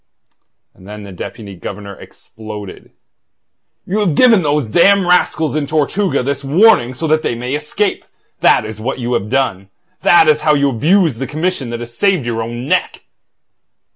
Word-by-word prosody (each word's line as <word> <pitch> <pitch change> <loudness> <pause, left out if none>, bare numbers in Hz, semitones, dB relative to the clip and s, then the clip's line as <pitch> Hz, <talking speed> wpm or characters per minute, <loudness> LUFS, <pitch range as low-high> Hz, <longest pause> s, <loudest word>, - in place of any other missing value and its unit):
And 95 - -18
then 105 0 -9
the 100 - -10
Deputy 100 +2 -8
Governor 100 +3 -8
exploded. 105 -3 -11 1.0
"You 200 +4 -2
have 185 -8 0
given 230 -3 +5
those 150 -3 0
damned 195 - +4
rascals 160 -3 +1
in 150 -2 -1
Tortuga 155 +3 0
this 140 +1 -3
warning 145 - +3
so 165 - -4
that 155 0 +2
they 120 - -2
may 125 +3 -5
escape! 150 +8 -2 0.4
That - - +3
is 110 0 -8
what 130 +4 -3
you 125 -1 -3
have 105 -1 -2
done. 110 -7 -1 0.3
That 170 -2 +5
is 155 0 +3
how 150 -1 +3
you 140 -1 +1
abuse 155 - +1
the 135 - -3
commission 155 -4 -3
that 120 0 -5
has 120 0 -9
saved 190 -4 +1
your 115 -1 -2
own 120 +2 -5
neck!" - - -1
140 Hz, 170 wpm, -16 LUFS, 115-165 Hz, 1.0 s, given